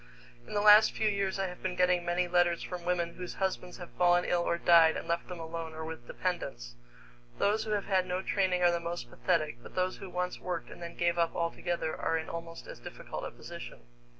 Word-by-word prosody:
In -, -, -6 dB
the 205 Hz, -, +2 dB
last 210 Hz, +1 st, +8 dB
few 220 Hz, -, 0 dB
years 200 Hz, -2 st, 0 dB
I 195 Hz, -, 0 dB
have 180 Hz, -1 st, -7 dB
been 185 Hz, -1 st, -2 dB
getting 180 Hz, -1 st, +3 dB
many 175 Hz, +1 st, 0 dB
letters 175 Hz, -1 st, +2 dB
from 180 Hz, -1 st, -6 dB
women 175 Hz, -1 st, 0 dB
whose 180 Hz, 0 st, -7 dB
husbands 185 Hz, -2 st, -2 dB
have 175 Hz, -2 st, -9 dB
fallen 175 Hz, 0 st, +4 dB
ill 175 Hz, -, +2 dB
or 170 Hz, -, 0 dB
died 165 Hz, -2 st, +6 dB
and -, -, -6 dB
left 170 Hz, 0 st, -1 dB
them 180 Hz, -1 st, -7 dB
alone 165 Hz, 0 st, -5 dB
or 160 Hz, 0 st, -5 dB
with 160 Hz, -7 st, -8 dB
dependents. -, -, -3 dB, 0.6 s
Those 215 Hz, +2 st, +2 dB
who 215 Hz, -, -3 dB
have 205 Hz, -1 st, 0 dB
had 190 Hz, -2 st, +2 dB
no 180 Hz, +1 st, -2 dB
training 185 Hz, -3 st, +1 dB
are 175 Hz, -, +6 dB
the 170 Hz, -, 0 dB
most 170 Hz, -8 st, -5 dB
pathetic, 155 Hz, -7 st, 0 dB
but -, -, -13 dB
those 185 Hz, 0 st, 0 dB
who 195 Hz, -, -8 dB
once 180 Hz, 0 st, -2 dB
worked 180 Hz, -2 st, -4 dB
and -, -, -11 dB
then 170 Hz, 0 st, -7 dB
gave 170 Hz, 0 st, +1 dB
up 170 Hz, -1 st, +1 dB
altogether 170 Hz, -1 st, -1 dB
are 165 Hz, -, 0 dB
in 160 Hz, -, -5 dB
almost 165 Hz, 0 st, -7 dB
as -, -, -9 dB
difficult -, -, -7 dB
a -, -, -4 dB
position. -, -, -9 dB
175 Hz, 230 wpm, -31 LUFS, 170-185 Hz, 0.6 s, last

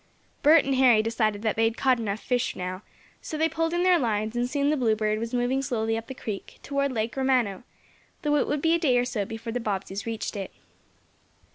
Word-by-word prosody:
Bert 305 Hz, +1 st, +6 dB
and 275 Hz, -, 0 dB
Harry 245 Hz, -5 st, +5 dB
decided 220 Hz, -2 st, 0 dB
that 220 Hz, -, +1 dB
they 225 Hz, -, +2 dB
had 225 Hz, +1 st, 0 dB
caught 260 Hz, -2 st, +2 dB
enough 210 Hz, -2 st, -2 dB
fish 245 Hz, -1 st, -1 dB
now, 185 Hz, +1 st, -5 dB, 0.4 s
so 310 Hz, -, -5 dB
they 320 Hz, +1 st, +3 dB
pulled 325 Hz, +1 st, -1 dB
in 345 Hz, +1 st, 0 dB
their 365 Hz, -2 st, +5 dB
lines, 215 Hz, -3 st, -1 dB
and 240 Hz, +1 st, 0 dB
soon 285 Hz, +1 st, +1 dB
the -, -, +2 dB
Bluebird 215 Hz, -4 st, +1 dB
was 230 Hz, +1 st, -4 dB
moving 250 Hz, +2 st, 0 dB
slowly 225 Hz, -4 st, -1 dB
up 225 Hz, 0 st, -5 dB
the 265 Hz, -, -7 dB
creek, 210 Hz, -5 st, -6 dB
toward 280 Hz, -1 st, -1 dB
Lake 225 Hz, -1 st, -2 dB
Romano, 255 Hz, -7 st, +1 dB, 0.6 s
though 295 Hz, -1 st, +2 dB
it -, -, +1 dB
would 295 Hz, -1 st, -1 dB
be 325 Hz, 0 st, +4 dB
a 335 Hz, -, +2 dB
day 265 Hz, -7 st, +3 dB
or 245 Hz, -, +2 dB
so 230 Hz, -5 st, -2 dB
before 225 Hz, +2 st, -6 dB
the 245 Hz, -, -1 dB
Bobbseys 200 Hz, -2 st, -4 dB
reached 225 Hz, -1 st, -4 dB
it. 195 Hz, -2 st, -4 dB
240 Hz, 225 wpm, -26 LUFS, 215-275 Hz, 0.6 s, Bert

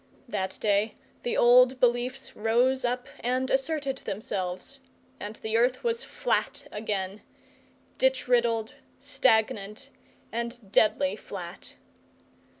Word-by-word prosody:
That 190 Hz, -4 st, -3 dB
day 210 Hz, +1 st, +1 dB, 0.3 s
the 240 Hz, -, -1 dB
old 250 Hz, +1 st, +6 dB
beliefs 250 Hz, +2 st, 0 dB
rose 245 Hz, +5 st, +2 dB
up 245 Hz, 0 st, -1 dB
and 255 Hz, +2 st, 0 dB
asserted 270 Hz, 0 st, 0 dB
themselves, 195 Hz, +4 st, -4 dB, 0.4 s
and 210 Hz, +1 st, -6 dB
the 220 Hz, +1 st, -1 dB
earth 245 Hz, +2 st, +2 dB
was 470 Hz, 0 st, 0 dB
flat -, -, -1 dB
again 205 Hz, -2 st, -3 dB, 0.8 s
ditch -, -, +2 dB
riddled, 235 Hz, -1 st, +2 dB, 0.2 s
stagnant, 220 Hz, -6 st, +1 dB, 0.4 s
and 235 Hz, -3 st, -4 dB
deadly 225 Hz, +8 st, +3 dB
flat. -, -, -8 dB
240 Hz, 105 wpm, -28 LUFS, 215-260 Hz, 0.8 s, old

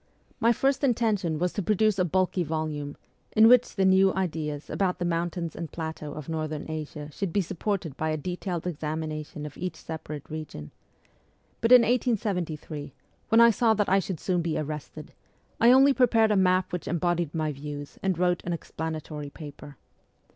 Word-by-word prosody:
My 230 Hz, -, +4 dB
first 270 Hz, +4 st, +1 dB
intention 215 Hz, -, +1 dB
was 180 Hz, +2 st, 0 dB
to 205 Hz, -, -2 dB
produce 210 Hz, +1 st, +2 dB
a -, -, +4 dB
bulky 185 Hz, +1 st, +1 dB
volume, 155 Hz, -2 st, -3 dB, 0.4 s
in 220 Hz, 0 st, +7 dB
which 250 Hz, +1 st, +5 dB
the 195 Hz, -, +2 dB
new 190 Hz, 0 st, +5 dB
ideas 155 Hz, -5 st, -3 dB
about 185 Hz, -2 st, 0 dB
the 180 Hz, -, -2 dB
mountains 170 Hz, -1 st, -2 dB
and 165 Hz, -2 st, -6 dB
plateaux 160 Hz, -3 st, -5 dB
of 155 Hz, -, -8 dB
Northern 155 Hz, -2 st, -3 dB
Asia 150 Hz, -1 st, -6 dB
should 195 Hz, +3 st, -3 dB
be 200 Hz, -, +2 dB
supported 180 Hz, -3 st, -3 dB
by 155 Hz, -, -1 dB
a 155 Hz, -, 0 dB
detailed 175 Hz, +2 st, -4 dB
examination 155 Hz, -2 st, -4 dB
of 150 Hz, -, -8 dB
each 180 Hz, -2 st, -3 dB
separate 155 Hz, -3 st, -7 dB
region; 155 Hz, -, -7 dB, 0.9 s
but 230 Hz, -, +2 dB
in 250 Hz, -1 st, +10 dB
1873, 180 Hz, -, -1 dB, 0.4 s
when 225 Hz, +1 st, +6 dB
I 235 Hz, 0 st, +8 dB
saw 225 Hz, 0 st, +3 dB
that 210 Hz, -1 st, +1 dB
I 195 Hz, +1 st, +5 dB
should 185 Hz, -3 st, -4 dB
soon 180 Hz, -2 st, 0 dB
be 165 Hz, -1 st, -1 dB
arrested, 150 Hz, 0 st, -6 dB, 0.5 s
I 235 Hz, -, +6 dB
only 270 Hz, +2 st, +7 dB
prepared 230 Hz, -4 st, +4 dB
a -, -, +3 dB
map 185 Hz, -1 st, +2 dB
which 180 Hz, -, -4 dB
embodied 175 Hz, -2 st, 0 dB
my 155 Hz, -1 st, 0 dB
views 145 Hz, 0 st, -8 dB
and 190 Hz, -3 st, 0 dB
wrote 180 Hz, 0 st, +1 dB
an 175 Hz, -, -2 dB
explanatory 155 Hz, -2 st, -5 dB
paper. 145 Hz, -1 st, -11 dB
170 Hz, 175 wpm, -27 LUFS, 155-195 Hz, 0.9 s, in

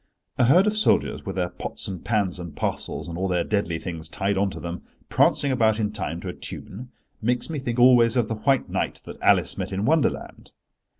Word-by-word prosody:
A 125 Hz, -, +5 dB
herd 175 Hz, +10 st, +5 dB
of 210 Hz, 0 st, +1 dB
soldiers 215 Hz, -, +1 dB
with -, -, -4 dB
their 90 Hz, -2 st, -1 dB
pots -, -, -6 dB
and 95 Hz, -3 st, -6 dB
pans 100 Hz, -6 st, 0 dB
and 85 Hz, -3 st, -8 dB
parcels, -, -, -3 dB
and 85 Hz, 0 st, -6 dB
all 95 Hz, -, 0 dB
their 90 Hz, -2 st, +1 dB
deadly 100 Hz, -5 st, -1 dB
things 85 Hz, -2 st, -5 dB
tied 100 Hz, 0 st, -1 dB
on 100 Hz, +1 st, +1 dB
to -, -, -8 dB
them, 85 Hz, 0 st, -6 dB, 0.3 s
prancing 140 Hz, -, +3 dB
about 110 Hz, -3 st, +2 dB
in 105 Hz, -1 st, 0 dB
time 95 Hz, -5 st, -4 dB
to 95 Hz, -, -5 dB
a -, -, -5 dB
tune, 120 Hz, +8 st, -7 dB, 0.3 s
makes 125 Hz, +7 st, -1 dB
me 155 Hz, -, -3 dB
think 120 Hz, -3 st, -3 dB
always 120 Hz, -1 st, +6 dB
of 120 Hz, -3 st, +2 dB
the 115 Hz, -, -2 dB
White 135 Hz, +5 st, +1 dB
Knight -, -, -3 dB
that -, -, -10 dB
Alice -, -, +3 dB
met -, -, -3 dB
in 95 Hz, +2 st, -2 dB
Wonderland. 155 Hz, +3 st, -1 dB
105 Hz, 220 wpm, -24 LUFS, 90-125 Hz, 0.3 s, always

